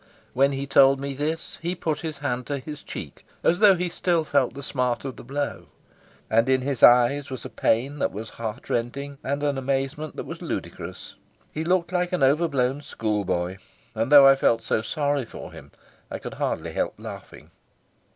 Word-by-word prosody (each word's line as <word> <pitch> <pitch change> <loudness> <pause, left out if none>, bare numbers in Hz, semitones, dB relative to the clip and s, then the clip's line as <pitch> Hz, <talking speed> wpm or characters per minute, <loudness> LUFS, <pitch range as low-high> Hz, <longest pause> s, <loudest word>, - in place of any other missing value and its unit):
When 140 +2 +3
he 135 +1 -3
told 135 0 +5
me 140 0 -4
this 155 +4 -4
he 175 +2 -2
put 160 -3 -2
his 160 -3 -5
hand 125 -4 -3
to 145 - -2
his 150 +2 -8
cheek - - -8 0.2
as 175 - +3
though 205 -3 +7
he 180 0 -1
still 170 -1 0
felt 140 -5 +1
the 140 - -7
smart 125 -2 -1
of 135 - -4
the - - -11
blow, 140 +4 -4 0.6
and 115 +3 +2
in 130 -1 +3
his 135 -2 -3
eyes 125 +4 +6
was 130 -2 -7
a - - -7
pain 135 +6 0
that - - 0
was 110 +3 -7
heartrending 120 +5 -4
and 140 +2 -2
an 145 -2 0
amazement 135 +3 -2
that - - -5
was - - -8
ludicrous. - - -6 0.4
He 155 - -3
looked 175 0 +1
like 180 -1 0
an 180 - +1
overblown 140 -2 +2
schoolboy, 95 -7 -2 0.4
and 115 +3 -1
though 145 -2 +10
I 135 - +7
felt 115 -4 +2
so 110 - 0
sorry 145 +4 -1
for - - -9
him, - - -13 0.4
I - - -4
could - - -7
hardly - - -2
help - - -2
laughing. - - -10
140 Hz, 190 wpm, -25 LUFS, 125-150 Hz, 0.6 s, though